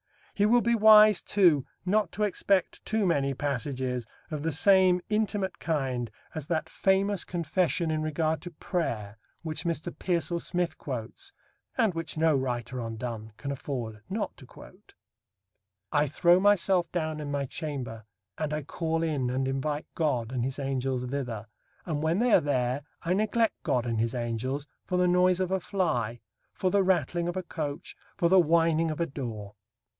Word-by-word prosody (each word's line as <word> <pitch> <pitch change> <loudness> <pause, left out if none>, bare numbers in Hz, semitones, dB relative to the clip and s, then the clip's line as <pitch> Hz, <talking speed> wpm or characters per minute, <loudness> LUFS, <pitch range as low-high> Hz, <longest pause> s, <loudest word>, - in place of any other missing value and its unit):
He 205 0 +3
will 240 +2 +5
be 235 +1 +2
wise, 215 -2 +7
too, 170 -9 +3 0.2
not 205 -1 +2
to 210 - -1
expect 195 -2 +1
too 220 -2 0
many 140 -6 +1
passages 130 -3 -2 0.2
of 150 -2 -3
the 165 +2 -1
same 185 +3 +5
intimate 210 -3 -1
kind 130 -7 -1 0.2
as 155 -2 -5
that 160 -2 -1
famous 195 0 +1
confession 170 -1 0
in 155 0 0
regard 155 +1 0
to 175 - -7
prayer 115 - -3 0.2
which 155 -1 -4
Mr. 170 0 -2
Pearsall 170 -1 0
Smith 175 -1 -2
quotes, 130 - -5 0.5
and 225 -6 +3
which 165 -1 -4
no 160 -1 +4
writer 125 -1 -2
on 115 -1 -5
Donne 110 -2 -6
can 140 +7 -4
afford 120 -6 -5
not 210 +3 -3
to 130 - -14
quote: - - -16 1.0
I 150 -1 +3
throw 175 +5 +4
myself 190 -2 +3
down 155 -3 -2
in 150 -1 -5
my 140 -1 -1
chamber, 125 - -5 0.3
and 155 -1 -1
I 150 0 -2
call 165 +2 -2
in, 145 -6 0
and 130 +1 0
invite 145 +3 -2
God, 125 -8 0
and 125 -2 -1
his 130 +2 -3
angels 135 -2 -1
thither, 125 -5 -4 0.4
and 155 -4 -2
when 160 +3 +1
they 240 +2 +3
are - - +7
there, 130 -2 0 0.2
I 170 - +1
neglect 215 +3 +1
God 125 -7 0
and 115 -2 -1
his 115 +2 0
Angels, 125 +4 -2 0.2
for 180 - 0
the 180 0 +3
noise 180 0 +4
of 185 -1 -1
a 190 - +2
fly, 120 - -1 0.3
for 185 - -1
the 200 - +4
rattling 175 -2 +1
of 175 +1 -3
a 185 - -2
coach, 155 -1 -5 0.2
for 175 -4 +3
the 190 +1 +7
whining 165 -1 +3
of 155 - -4
a 170 - +2
door. 115 -9 -6
155 Hz, 175 wpm, -28 LUFS, 130-180 Hz, 1.0 s, wise